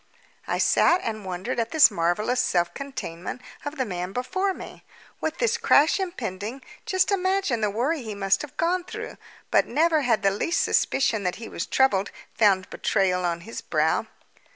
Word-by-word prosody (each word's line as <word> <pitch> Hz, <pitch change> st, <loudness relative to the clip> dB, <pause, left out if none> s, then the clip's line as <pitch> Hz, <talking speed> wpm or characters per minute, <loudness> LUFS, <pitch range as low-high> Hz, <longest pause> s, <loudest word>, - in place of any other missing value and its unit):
I -, -, 0 dB
sat 355 Hz, -, +4 dB
and 215 Hz, -3 st, -4 dB
wondered 185 Hz, +7 st, -3 dB
at 230 Hz, 0 st, -1 dB
the 315 Hz, +2 st, +7 dB
marvellous 195 Hz, +8 st, 0 dB
self 175 Hz, -7 st, +1 dB
containment 250 Hz, -, -6 dB, 0.2 s
of 290 Hz, +1 st, -5 dB
the 260 Hz, -, 0 dB
man 180 Hz, -2 st, -4 dB
before 375 Hz, +11 st, -1 dB
me. -, -, -10 dB, 0.4 s
With 315 Hz, 0 st, -3 dB
this 480 Hz, -2 st, +1 dB
crash 300 Hz, +7 st, +4 dB
impending, 245 Hz, -, -4 dB, 0.2 s
just 375 Hz, +1 st, +2 dB
imagine 375 Hz, -, +1 dB
the 210 Hz, -, +2 dB
worry 260 Hz, +9 st, -1 dB
he 220 Hz, -3 st, -6 dB
must 195 Hz, -1 st, +1 dB
have 300 Hz, -, -9 dB
gone 350 Hz, +2 st, +1 dB
through! 365 Hz, -, -7 dB, 0.3 s
But -, -, +4 dB
never 315 Hz, +3 st, +2 dB
had 235 Hz, -6 st, +1 dB
the 195 Hz, -, +4 dB
least 330 Hz, -, 0 dB
suspicion 230 Hz, -5 st, +1 dB
that 180 Hz, -2 st, -1 dB
he 225 Hz, -, -8 dB
was -, -, -5 dB
troubled 215 Hz, -7 st, +2 dB, 0.2 s
found 195 Hz, -4 st, +3 dB
betrayal 185 Hz, -2 st, +1 dB
on 170 Hz, -1 st, -1 dB
his 225 Hz, +6 st, -7 dB
brow. -, -, 0 dB
235 Hz, 175 wpm, -25 LUFS, 195-315 Hz, 0.4 s, the